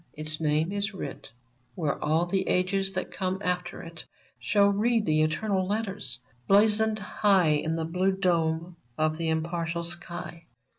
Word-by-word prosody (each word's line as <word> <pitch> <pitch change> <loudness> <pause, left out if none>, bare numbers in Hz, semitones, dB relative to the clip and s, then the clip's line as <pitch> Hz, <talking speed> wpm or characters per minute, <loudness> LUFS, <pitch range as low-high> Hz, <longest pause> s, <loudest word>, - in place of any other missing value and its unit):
Its 155 +1 -4
name 155 +3 +1
is 205 +1 0
\vrit 190 - -7 0.5
Where 150 -5 -2
all 160 +3 +2
the 190 +2 -1
ages 195 +1 +1
that 185 - -3
come 185 -1 -2
after 180 -1 -2
it 165 -1 -8 0.4
Shall 200 +11 +3
read 220 +2 +2
the 155 -1 +3
eternal 185 +4 0
letters, 200 - -3 0.3
blazoned 215 +2 +4
high 190 -7 +2
On 160 - 0
the 165 -1 -2
blue 180 +4 +1
dome 170 -2 0 0.2
of 155 0 +1
the 165 -1 0
impartial 165 +1 -1
sky. 170 -1 -6
175 Hz, 150 wpm, -27 LUFS, 160-195 Hz, 0.5 s, blazoned